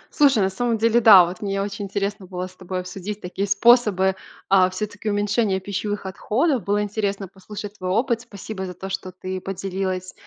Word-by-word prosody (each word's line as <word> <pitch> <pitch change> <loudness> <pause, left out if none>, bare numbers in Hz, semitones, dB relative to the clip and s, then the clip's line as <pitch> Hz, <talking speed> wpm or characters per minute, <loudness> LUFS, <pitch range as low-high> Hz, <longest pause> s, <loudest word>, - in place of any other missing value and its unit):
Слушай, 275 -8 +5
на 190 - +1
самом 230 +4 0
деле 230 +2 +3
да, 200 -6 +9
вот 175 +1 -7
мне 195 -1 -2
очень 200 0 -3
интересно 200 0 -3
было 180 0 -4
с 185 0 -12
тобой 185 0 -4
обсудить 195 +3 -6
такие 195 +2 -3
способы, 200 -3 +4 0.4
э, 185 -1 +6
всё-таки 210 +3 -4
уменьшения 205 -1 +1
пищевых 205 +1 -4
отходов. 240 - 0
Было 205 +1 +1
интересно 200 -1 -2
послушать 205 +2 -9
твой 185 0 -3
опыт. 230 +4 +1
Спасибо 205 -4 -7
за 180 - -8
то, 190 - -7
что 190 -1 -4
ты 185 +1 -6
поделилась, 190 -1 -3
200 Hz, 180 wpm, -23 LUFS, 185-210 Hz, 0.4 s, да